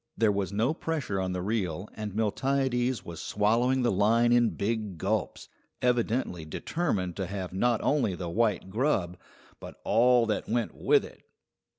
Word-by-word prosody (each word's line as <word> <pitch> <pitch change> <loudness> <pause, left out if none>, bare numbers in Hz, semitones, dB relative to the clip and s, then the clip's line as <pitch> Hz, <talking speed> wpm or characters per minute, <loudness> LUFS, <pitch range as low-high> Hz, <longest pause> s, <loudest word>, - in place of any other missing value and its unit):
There 110 -2 +3
was 100 -2 -2
no 115 +8 +1
pressure 155 - -3
on 95 -1 -2
the 90 -1 -3
reel, 95 -3 -2
and 105 -2 -6
Miltiades 125 +3 0
was 85 -2 -7
swallowing 120 +5 +1
the 120 - +2
line 115 +5 +3
in 120 -1 +4
big 105 -3 -3
gulps, - - -2 0.3
evidently 120 -7 0
determined 95 - -2
to 95 -3 -2
have 95 -2 -5
not 115 +4 +1
only 135 -10 +1
the 90 -1 -5
white 105 0 0
grub, 105 - 0 0.4
but - - -10
all 120 +2 +4
that 110 -2 -2
went 120 0 0
with - - +2
it. - - -14
110 Hz, 160 wpm, -28 LUFS, 95-120 Hz, 0.4 s, in